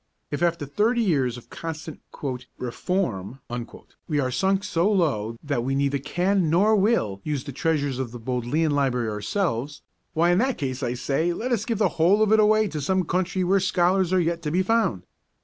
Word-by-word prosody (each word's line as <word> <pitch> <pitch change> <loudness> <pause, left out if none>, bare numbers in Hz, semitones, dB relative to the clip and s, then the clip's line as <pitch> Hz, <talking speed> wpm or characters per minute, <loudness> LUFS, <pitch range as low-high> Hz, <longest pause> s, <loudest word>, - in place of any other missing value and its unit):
If 145 - -3
after 170 -3 +1
thirty 220 - +1
years 135 - +1
of 120 - -14
constant 160 -1 -6 0.6
'reform' 125 - -2 0.7
we 150 -3 0
are 130 -2 0
sunk 190 +7 +1
so 170 +4 +1
low 115 - 0
that 140 -5 -1
we 135 +2 -1
neither 140 0 +1
can, 180 +4 +1
nor 200 +7 +4
will, 190 - +1
use 150 -4 -2
the 140 - -7
treasures 145 -2 -1
of 130 -3 -3
the 120 - -7
Bodleian 125 +6 -1
Library 130 -5 +1
ourselves, 130 - -2 0.3
why 170 +1 +3
in 175 - +3
that 260 +1 +1
case 130 -4 -3
I 120 - -1
say 150 +7 0
let 245 +8 -3
us 220 -3 0
give 230 -3 -1
the 210 -1 +3
whole 200 +6 +5
of 215 - +1
it 220 - +6
away 215 0 +4
to 155 -3 -4
some 185 +6 +1
country 185 +2 0
where 190 +2 +3
scholars 185 0 +2
are 185 - +3
yet 170 0 0
to 155 - -2
be 180 +5 +1
found. 190 - +1
165 Hz, 195 wpm, -24 LUFS, 135-190 Hz, 0.7 s, it